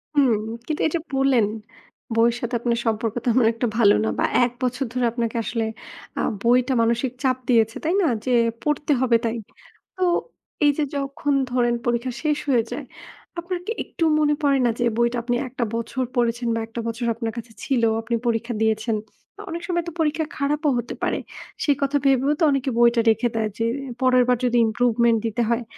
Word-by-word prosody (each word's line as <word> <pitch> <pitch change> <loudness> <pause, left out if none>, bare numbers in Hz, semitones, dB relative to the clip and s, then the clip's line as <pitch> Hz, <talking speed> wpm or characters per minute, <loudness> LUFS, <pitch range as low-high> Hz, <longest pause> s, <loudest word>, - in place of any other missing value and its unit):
হুম। 270 -5 +4 0.3
কিন্তু 310 - -3
এই - - -4
যে - - +1 0.2
বললেন, 265 -5 +3 0.7
বইয়ের 230 +1 +4
সাথে 240 +1 -2
আপনার 235 0 0
সম্পর্ক 225 0 0
তেমন 245 0 +3
একটা 235 +1 -1
ভালো 205 -3 +6
না - - 0
বা - - +3 0.2
১ 240 - -3
বছর 250 +2 0
ধরে 250 -1 +1
আপনাকে 235 -1 -2
আসলে 230 -1 -2 0.5
আ - - +1 0.2
বইটা 250 +2 +3
মানসিক 235 +2 +1
চাপ 255 -1 +2
দিয়েছে, 225 -1 +3
তাই 330 +3 +1
না? 335 - +3 0.2
যে 255 - 0 0.3
পড়তে 295 0 0
হবে 240 -3 +4
তাই। 230 +1 -1 0.6
তো 370 - -10 0.6
এই 290 - +6
যে 305 - +1
যখন 280 +1 -1 0.2
ধরেন 240 -1 +2
পরীক্ষা 240 +1 0
শেষ 300 -1 +1
হয়ে 240 -4 +3
যায়, 265 +2 -5 0.5
আপনার 350 +1 -3
কি 445 - -3
একটুও 330 -2 -1
মনে 295 -1 +3
পড়ে 280 -1 +4
না? - - +4
যে, - - +1
বইটা 235 +1 +2
আপনি 240 0 0
১ 250 - -14
টা - - +3
বছর 230 +3 -2
পড়েছেন 240 0 0
বা - - -1
১ 225 - -24
টা - - -2
বছর 230 +1 -3
আপনার 230 -1 -3
কাছে 230 0 -7
ছিল, 250 -4 0 0.2
আপনি 230 +1 -2
পরীক্ষা 235 +1 0
দিয়েছেন। 220 0 +1 0.4
তো - - -22
অনেক 340 +1 -4
সময় 345 -1 0
তো, - - -3
পরীক্ষা 315 0 +1
খারাপও 295 +1 +1
হতে 240 - -4
পারে, - - 0 0.4
সে 290 - +3
কথা 280 +1 +2
ভেবেও 270 +1 +3
তো 335 - +2
অনেকে 275 -1 0
বইটা 235 0 +5
রেখে 225 +2 +2
দেয় 220 -1 0
যে, 225 - -1 0.4
পরের 255 -1 +5
বার 250 -1 +3
যদি 245 0 +2
ইমপ্রুভমেন্ট 235 0 +2
দিতে 225 +2 -1
হয়? 235 +1 +1
245 Hz, 200 wpm, -23 LUFS, 230-275 Hz, 0.7 s, ভালো